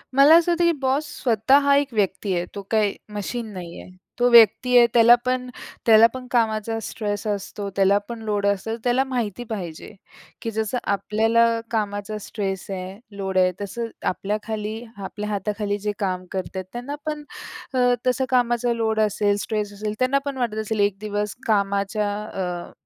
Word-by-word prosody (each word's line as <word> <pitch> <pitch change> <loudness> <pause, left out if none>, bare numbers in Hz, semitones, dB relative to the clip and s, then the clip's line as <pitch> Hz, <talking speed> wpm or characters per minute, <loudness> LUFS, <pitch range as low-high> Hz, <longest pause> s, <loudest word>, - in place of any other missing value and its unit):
मला 285 +4 +8
असं 345 +1 +2
होत, 340 - +1
की 340 0 +5
बॉस 270 +3 +1 0.2
स्वतः 235 +3 +4
हा 280 0 +3
एक 280 -3 0
व्यक्ती 195 -2 0
आहे. 175 - -1
तो 200 - -4
काही 215 -2 +2 0.2
मशीन 225 +3 -4
नाही 175 -2 -8
आहे. - - -13 0.3
तो 245 - +4
व्यक्ती 235 +2 +6
आहे, 240 -1 +7
त्याला 235 0 +8
पण 255 0 -1 0.4
त्याला 225 0 +8
पण 255 -1 -7
कामाचा 225 -1 0
स्ट्रेस 205 -1 -4
असतो. 205 0 -3
त्याला 195 +1 +4
पण 235 -1 -6
लोड 205 -2 -1
असलं, 200 +3 -1
त्याला 250 +2 +2
माहिती 245 -4 -3
पाहिजे, 180 -4 -6 0.5
की 225 - -3
जसं 220 +2 -2 0.2
आपल्याला 220 +4 +2 0.3
कामाचा 210 -1 -2
स्ट्रेस 195 -3 -4
आहे, 190 +2 -6 0.2
लोड 190 -1 -2
आहे, 185 0 +4
तसं 230 +4 -4 0.2
आपल्याखाली 210 +2 -3 0.3
आपल्या 210 +2 -5
हाताखाली 205 0 -2
जे 210 - +1
काम 185 -2 -2
करतात, 190 0 -4
त्यांना 245 +5 -5
पण 300 -1 -3 0.5
अ, 250 -1 +3
तसं 255 +1 +2
कामाचा 240 -1 +2
लोड 220 -1 0
असेल, 205 -1 +2
स्ट्रेस 210 -2 -3
असेल, 210 +1 -4
त्यांना 255 +2 +2
पण 280 -2 -3
वाटत 235 -4 -2
असेल, 220 0 -3
1 205 -1 +2
दिवस 210 -1 -3
कामाच्या 200 0 +1
अ, 180 -4 -5
215 Hz, 170 wpm, -23 LUFS, 200-240 Hz, 0.5 s, मला